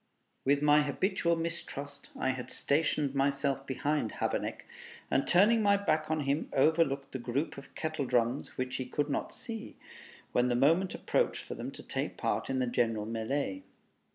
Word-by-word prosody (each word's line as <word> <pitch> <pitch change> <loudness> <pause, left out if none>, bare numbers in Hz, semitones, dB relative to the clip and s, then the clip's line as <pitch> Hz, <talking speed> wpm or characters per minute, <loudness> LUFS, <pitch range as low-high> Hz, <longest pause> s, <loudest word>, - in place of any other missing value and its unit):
With 140 +2 +3
my 150 0 +6
habitual 170 +4 +1
mistrust, 165 -4 -5
I 130 - +1
had 130 -1 -6
stationed 145 -1 +1
myself 140 0 0
behind 145 -2 -1
Habeneck, - - -2 0.5
and 135 - +2
turning 210 +6 +5
my 200 -1 +5
back 155 -6 0
on 155 -1 +1
him, 140 +2 0
overlooked 140 -1 +2
the 130 - -4
group 130 +6 -2
of 140 - -12
kettle 155 -3 -2
drums, 120 +1 0
which 130 0 -2
he 130 - -3
could 145 +3 -1
not - - -2
see, 225 -1 -7 0.5
when 125 0 +3
the 120 - +1
moment 165 +9 +3
approached - - 0
for - - -6
them - - -5
to - - -10
take - - -3
part - - -1
in 135 - 0
the 130 - +2
general 115 -3 0
melee. 110 -2 -2
140 Hz, 170 wpm, -31 LUFS, 130-160 Hz, 0.5 s, my